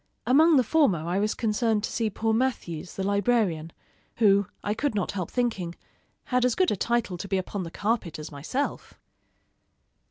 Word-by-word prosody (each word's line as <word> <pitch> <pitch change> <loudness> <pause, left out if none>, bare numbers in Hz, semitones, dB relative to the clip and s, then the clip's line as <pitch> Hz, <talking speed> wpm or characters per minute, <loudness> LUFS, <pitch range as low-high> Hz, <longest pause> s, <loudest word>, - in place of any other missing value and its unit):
Among 310 +5 +5
the 255 - +5
former 280 - +3
I 180 +3 0
was 210 +1 0
concerned 220 -1 0
to - - -2
see 225 -2 0
poor 220 +2 -1
Mathews, 185 -9 -2
the 195 - -3
librarian, 200 -5 +1 0.4
who, 200 -3 +4 0.2
I 205 - 0
could 230 +1 -1
not 200 - -1
help 185 -4 -4
thinking, 200 -9 -1 0.5
had 250 -1 +1
as 250 -1 +2
good 370 -1 +2
a - - +1
title 230 -3 -1
to 200 - -5
be 195 - 0
upon 190 +2 -3
the 170 - -5
carpet 205 -2 -2
as 155 0 -8
myself. 165 - -4
210 Hz, 180 wpm, -26 LUFS, 185-240 Hz, 0.5 s, Among